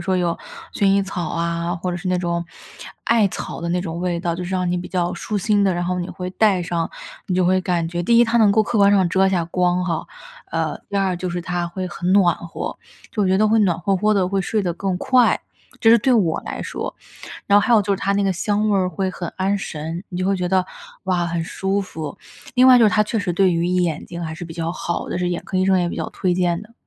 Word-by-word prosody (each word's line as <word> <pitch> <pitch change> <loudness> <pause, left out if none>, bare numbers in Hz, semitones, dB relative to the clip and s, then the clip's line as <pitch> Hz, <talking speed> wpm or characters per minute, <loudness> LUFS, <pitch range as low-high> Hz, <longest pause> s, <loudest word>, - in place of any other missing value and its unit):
说 185 +1 0
有 175 -2 0 0.4
薰 200 - +1
衣 195 0 +4
草 180 -4 -4
啊， 170 +1 -2
或 180 +1 -3
者 175 - -3
是 185 +1 -4
那 180 - +2
种 170 -1 -1 0.6
艾 225 -4 +3
草 - - -6
的 170 - -3
那 180 +1 0
种 170 -1 -5
味 175 -1 -1
道， 170 -1 -2
就 180 - -5
是 180 - -5
让 180 -1 0
你 180 - 0
比 175 - -6
较 175 -2 -1
舒 215 - -4
心 205 0 +2
的。 190 -3 +2
然 175 0 -2
后 180 0 -1
你 175 - -3
会 180 0 -5
戴 195 -3 +2
上， 170 -1 -2 0.4
你 185 - -1
就 185 -1 +2
会 185 +1 +3
感 175 -3 0
觉 175 +1 -3
第 230 +6 +3
一 240 - +7
它 235 +1 +1
能 215 -2 +5
够 215 +2 +4
客 225 0 -1
观 200 0 +6
上 195 -3 +4
遮 190 +2 +3
下 175 -3 0
光 180 +1 0
哈， 165 -3 -2 0.4
呃， - - -2
第 200 - -3
二 195 -2 +1
就 185 - -3
是 175 0 -3
它 175 -1 -2
会 185 +1 -4
很 180 0 -3
暖 180 -4 +5
和。 170 - -6 0.3
就 210 - 0
我 190 - +2
觉 190 - +3
得 215 +2 +3
会 220 +1 +3
暖 185 -6 +2
和 195 +3 0
和 210 +3 +2
的， 190 -3 +2
会 195 +1 0
睡 210 +3 -1
得 175 - -1
更 185 +1 -2
快， 250 +4 +3 0.4
这 225 - +5
是 235 - +7
对 255 +4 +2
我 180 -8 +2
来 - - -5
说。 - - -5 0.5
然 200 - +3
后 - - +1
还 240 - +3
有 215 - +6
就 200 +1 0
是 - - -2
它 200 - -1
那 200 - +1
个 195 - +2
香 210 +4 0
味 200 - +3
儿 185 -1 +1
会 185 +2 -2
很 175 -2 -5
安 195 +2 +1
神， 165 0 -5
你 180 - -5
就 185 - -1
会 195 0 +2
觉 180 -1 -2
得， 185 -1 +2 0.4
哇， 180 -2 0
很 170 0 -2
舒 195 +3 -1
服。 160 -6 -7 0.4
另 255 +1 +6
外 255 -1 +9
就 235 - +5
是 - - +5
它 210 +2 +3
确 220 +2 -2
实 180 -2 -1
对 185 0 +3
于 170 +1 0
眼 175 -3 0
睛 170 0 -7
还 160 0 -4
是 175 - -7
比 165 - -9
较 165 0 -3
好 170 -1 -3
的， - - -2
是 180 0 -1
眼 175 - -2
科 190 - -5
医 185 - +2
生 190 -1 +3
也 175 - +1
比 - - -5
较 - - -3
推 180 -2 -1
荐 175 -1 0
的。 215 +2 -15
185 Hz, 295 characters per minute, -21 LUFS, 175-200 Hz, 0.6 s, 外